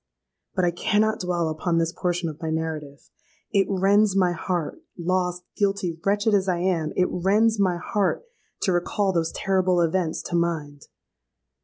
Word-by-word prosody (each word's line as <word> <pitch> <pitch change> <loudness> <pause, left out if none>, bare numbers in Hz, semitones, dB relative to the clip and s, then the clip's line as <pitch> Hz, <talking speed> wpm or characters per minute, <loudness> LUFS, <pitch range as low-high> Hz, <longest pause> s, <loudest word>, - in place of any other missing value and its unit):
"But 185 -2 +2
I 175 - +2
cannot 215 +5 +1
dwell 175 -2 -1
upon 165 +2 -1
this 165 0 +1
portion 175 -1 -1
of 155 +1 -7
my 160 - -2
narrative: 155 -3 -4 0.4
it 195 -1 +3
rends 200 +1 +3
my 185 -2 +3
heart—lost, 180 +1 -2
guilty, 195 -5 -1
wretched 205 +2 +2
as 195 -1 +2
I 180 - +1
am,—it 175 -1 0
rends 210 +5 +2
my 185 -3 +2
heart 200 - -1 0.4
to 190 - +1
recall 190 +3 +1
those 165 -2 0
terrible 185 -2 +1
events 170 0 0
to 175 - -4
mind! 155 -4 -2
180 Hz, 150 wpm, -24 LUFS, 165-195 Hz, 0.4 s, it